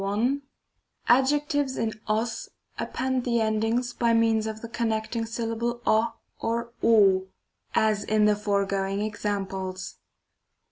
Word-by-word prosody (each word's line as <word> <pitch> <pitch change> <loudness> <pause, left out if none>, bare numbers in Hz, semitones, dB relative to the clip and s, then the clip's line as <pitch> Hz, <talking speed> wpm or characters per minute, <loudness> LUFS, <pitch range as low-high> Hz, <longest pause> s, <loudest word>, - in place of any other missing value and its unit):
L 220 +8 +1 0.7
Adjectives 285 +2 +2
in 225 -1 -1
og 220 +2 +1 0.5
append 260 -1 -1
the 235 -1 +1
endings 225 +3 0
by 235 -1 +2
means 225 -1 +3
of 220 0 -5
the 230 - -6
connecting 225 0 -2
syllable 230 +1 -2
o 220 +2 +3 0.3
(c?), 235 +1 -2
(g. - - +2
n.), 195 -4 +5 0.5
as 215 -2 +2
in 215 0 +2
the 210 0 +4
foregoing 200 -1 0
examples. 195 -3 -3
220 Hz, 125 wpm, -26 LUFS, 210-235 Hz, 0.7 s, n